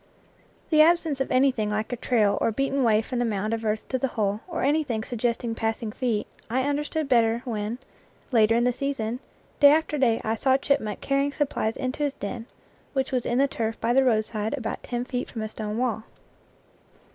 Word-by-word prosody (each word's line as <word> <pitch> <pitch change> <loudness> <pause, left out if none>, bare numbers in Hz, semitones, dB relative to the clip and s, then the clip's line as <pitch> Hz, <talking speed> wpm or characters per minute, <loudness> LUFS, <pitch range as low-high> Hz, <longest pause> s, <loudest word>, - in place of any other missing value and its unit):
The 310 -1 +6
absence 320 -4 +3
of 270 - -1
anything 255 -5 +2
like 215 +3 -2
a - - 0
trail 225 -4 +1
or - - +2
beaten 275 +3 0
way 220 -2 +3
from 250 +2 -3
the - - +2
mound 215 -1 -1
of 225 0 -3
earth 215 0 -1
to 260 - -1
the 270 - +1
hole, 210 -3 -1
or 340 -2 -3
anything 280 -6 +1
suggesting 235 0 -2
passing 225 -1 -2
feet, 230 -3 -1 0.2
I 255 +3 +1
understood 295 +1 -1
better 235 -2 +3
when, 220 -1 -3 0.5
later 225 -2 +4
in 235 - +3
the 245 0 +2
season, 250 -3 -2 0.4
day 285 -1 +8
after 305 -1 +1
day 235 -4 +3
I 220 +1 -1
saw 265 +3 +3
a - - +4
chipmunk 275 -7 -1
carrying 275 +1 0
supplies 270 -7 -1
into 260 +2 -3
his 285 -1 0
den, 225 +3 -6 0.5
which 265 -1 -1
was 250 -2 -1
in 240 - 0
the 275 +1 +4
turf 225 -4 -3
by 235 +1 +1
the 270 +1 +5
roadside 220 -1 0
about 225 -4 -4
ten 245 0 -3
feet 250 0 -3
from 225 -3 -5
a 215 - -4
stone 215 0 -5
wall. 230 -3 -1
240 Hz, 205 wpm, -25 LUFS, 220-275 Hz, 0.5 s, day